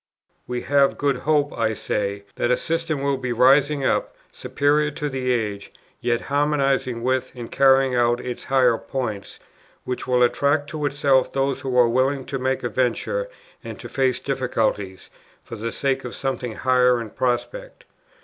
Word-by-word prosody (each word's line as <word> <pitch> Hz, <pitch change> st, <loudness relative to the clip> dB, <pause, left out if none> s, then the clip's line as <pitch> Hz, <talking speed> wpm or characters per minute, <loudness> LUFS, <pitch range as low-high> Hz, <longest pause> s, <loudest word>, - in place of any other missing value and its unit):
"We 125 Hz, 0 st, -3 dB
have 140 Hz, -1 st, +2 dB
good 140 Hz, -2 st, +1 dB
hope," 145 Hz, +1 st, +1 dB
I 110 Hz, -1 st, 0 dB
say, 100 Hz, -1 st, -3 dB
"that 120 Hz, -, 0 dB
a 125 Hz, -, +3 dB
system 165 Hz, -3 st, -2 dB
will 140 Hz, -1 st, +1 dB
be 130 Hz, -1 st, -4 dB
rising 135 Hz, +3 st, +4 dB
up, -, -, 0 dB, 0.2 s
superior 150 Hz, +1 st, +1 dB
to 150 Hz, 0 st, -4 dB
the 130 Hz, -2 st, -2 dB
age, 105 Hz, -4 st, -2 dB, 0.3 s
yet 120 Hz, -1 st, 0 dB
harmonizing 135 Hz, -4 st, 0 dB
with, 130 Hz, 0 st, 0 dB
and 120 Hz, -2 st, -8 dB
carrying 135 Hz, -1 st, +4 dB
out 120 Hz, 0 st, +2 dB
its 125 Hz, -1 st, -6 dB
higher 130 Hz, -4 st, +3 dB
points, 110 Hz, -7 st, -5 dB, 0.5 s
which 125 Hz, 0 st, -5 dB
will 125 Hz, -1 st, +3 dB
attract 145 Hz, +4 st, +1 dB
to 150 Hz, -1 st, -1 dB
itself 140 Hz, -2 st, +2 dB
those 135 Hz, -1 st, -1 dB
who 130 Hz, -2 st, -2 dB
are 120 Hz, -1 st, +6 dB
willing 130 Hz, +3 st, +1 dB
to 135 Hz, 0 st, -4 dB
make 130 Hz, +1 st, -1 dB
a 120 Hz, -, -1 dB
venture 130 Hz, -, -1 dB, 0.3 s
and -, -, -8 dB
to -, -, -8 dB
face 130 Hz, -2 st, 0 dB
difficulties, 110 Hz, -8 st, -2 dB, 0.3 s
for -, -, -8 dB
the 115 Hz, +1 st, -4 dB
sake 135 Hz, -1 st, -1 dB
of 125 Hz, -, -6 dB
something 130 Hz, -4 st, -3 dB
higher 125 Hz, -1 st, +3 dB
in 115 Hz, -3 st, -7 dB
prospect. -, -, -3 dB
130 Hz, 170 wpm, -22 LUFS, 120-140 Hz, 0.5 s, are